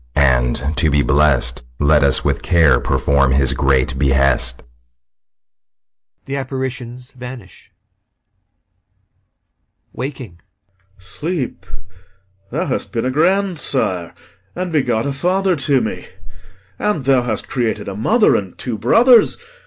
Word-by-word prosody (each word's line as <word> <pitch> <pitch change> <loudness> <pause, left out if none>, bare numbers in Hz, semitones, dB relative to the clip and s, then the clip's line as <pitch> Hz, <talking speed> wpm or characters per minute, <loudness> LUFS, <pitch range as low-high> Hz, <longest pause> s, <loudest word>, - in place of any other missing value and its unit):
and, 65 +1 +1
to 80 - +3
be 70 -1 +1
blest, 75 -4 +2
Let 75 +2 +3
us 70 -2 +4
with - - -1
care 80 -8 +3
perform 70 0 +1
his 70 0 +4
great 65 -1 +1
behest. 65 -3 +3 1.6
[GHOSTS 130 -2 -6
vanish] 125 -7 -11 2.2
POSTHUMUS. - - -45
[Waking] 125 - -7 0.6
Sleep, 125 - -5 0.8
thou 165 - -3
has - - -3
been 115 0 -4
a 130 - -1
grandsire 150 - 0 0.4
and 180 0 -4
begot 125 -7 0
A 140 - -2
father 185 +5 0
to 140 -1 +1
me; 95 -5 -5 0.7
and 170 -11 -2
thou 135 -2 +3
hast 115 -3 -4
created 115 -5 -3
A 100 - -6
mother 215 - +2
and 95 -3 -4
two 115 -4 -5
brothers. 230 - +4
115 Hz, 115 wpm, -17 LUFS, -, 2.2 s, us